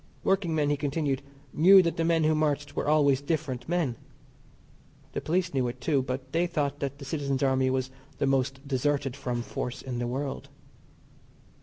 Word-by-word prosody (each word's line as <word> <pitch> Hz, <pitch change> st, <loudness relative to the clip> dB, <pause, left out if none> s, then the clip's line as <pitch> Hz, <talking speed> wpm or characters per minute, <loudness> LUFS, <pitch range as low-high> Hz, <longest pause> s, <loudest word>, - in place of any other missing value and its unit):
Workingmen, 165 Hz, -7 st, +1 dB
he 145 Hz, -, +1 dB
continued, 140 Hz, -1 st, -1 dB, 0.3 s
knew 190 Hz, +4 st, +7 dB
that 170 Hz, -, 0 dB
the 165 Hz, -, 0 dB
men 165 Hz, -1 st, +2 dB
who 155 Hz, +1 st, +3 dB
marched 150 Hz, -2 st, 0 dB
were -, -, -2 dB
always 145 Hz, -3 st, +4 dB
different 145 Hz, -4 st, -3 dB
men. 170 Hz, -9 st, 0 dB, 1.2 s
The -, -, -2 dB
police 180 Hz, +2 st, 0 dB
knew 130 Hz, -2 st, +1 dB
it, 120 Hz, +1 st, -5 dB
too, 140 Hz, +1 st, +1 dB
but 130 Hz, +1 st, -5 dB
they 170 Hz, +3 st, +1 dB
thought 145 Hz, -4 st, -1 dB
that 140 Hz, 0 st, -3 dB
the 140 Hz, -, -9 dB
Citizens 140 Hz, -2 st, -1 dB
Army 130 Hz, -1 st, +2 dB
was 130 Hz, 0 st, -1 dB, 0.3 s
the -, -, +1 dB
most 135 Hz, +1 st, 0 dB
deserted 140 Hz, -1 st, 0 dB
from 125 Hz, -4 st, -3 dB
force 125 Hz, +1 st, -4 dB
in 125 Hz, -2 st, -4 dB
the 120 Hz, -, -1 dB
world. 135 Hz, +3 st, -4 dB
140 Hz, 175 wpm, -28 LUFS, 130-155 Hz, 1.2 s, knew